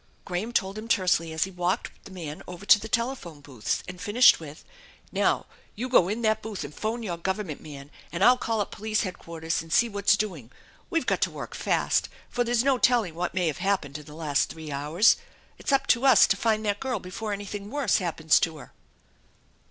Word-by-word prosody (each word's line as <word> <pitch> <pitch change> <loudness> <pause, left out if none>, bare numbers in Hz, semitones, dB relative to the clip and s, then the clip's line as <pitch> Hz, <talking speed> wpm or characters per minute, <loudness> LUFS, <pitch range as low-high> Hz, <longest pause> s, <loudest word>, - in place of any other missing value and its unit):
Graham 185 +6 -3
told 195 -2 -1
him 220 - -8
tersely 185 -6 +2
as 160 0 0
he 190 - -5
walked 180 0 -1
the - - -10
man 160 -5 -7
over 180 +2 -9
to 205 +1 +7
the 220 - -7
telephone 235 - -2
booths, 135 -7 -3
and 180 0 -8
finished 210 +6 +6
with: 155 -1 -11 0.2
" - - -26
Now, - - +1 0.3
you 245 +5 -3
go 185 -8 +5
in 225 +3 -3
that 220 0 +2
booth 215 -3 -5
and 145 - -8
phone 225 +6 -3
your 175 -5 -3
Government 190 -2 -3
man, 145 -1 -10 0.2
and 170 +3 -1
I'll 245 - +7
call 225 -2 -1
up 205 - -4
police 215 0 -1
headquarters 165 -4 -3
and 165 0 -12
see 235 - +4
whaf 200 -3 -6
s 200 - +7
doing. 170 - -4 0.4
We've 330 -1 0
got - - 0
to - - +2
work - - -8
fast, - - 0 0.2
for 245 - 0
there's 240 0 +1
no 270 -2 +2
telling 235 -10 +3
what 175 +2 -3
may 180 -2 +1
have 155 -3 -1
happened 165 -8 -1
in 150 - -13
the 150 - -12
last 145 -5 0
three 160 -2 -8
hours. 150 +10 +3 0.4
It's - - -2
up 275 0 +3
to 235 +2 -6
us 260 -7 +7
to - - +2
find 215 +1 0
that 205 -1 0
girl 260 -3 -2
before 200 +3 -6
anything 205 0 -5
worse 275 -5 +1
happens 160 -3 +2
to 160 -1 -1
her." - - -13
195 Hz, 220 wpm, -26 LUFS, 165-220 Hz, 0.4 s, to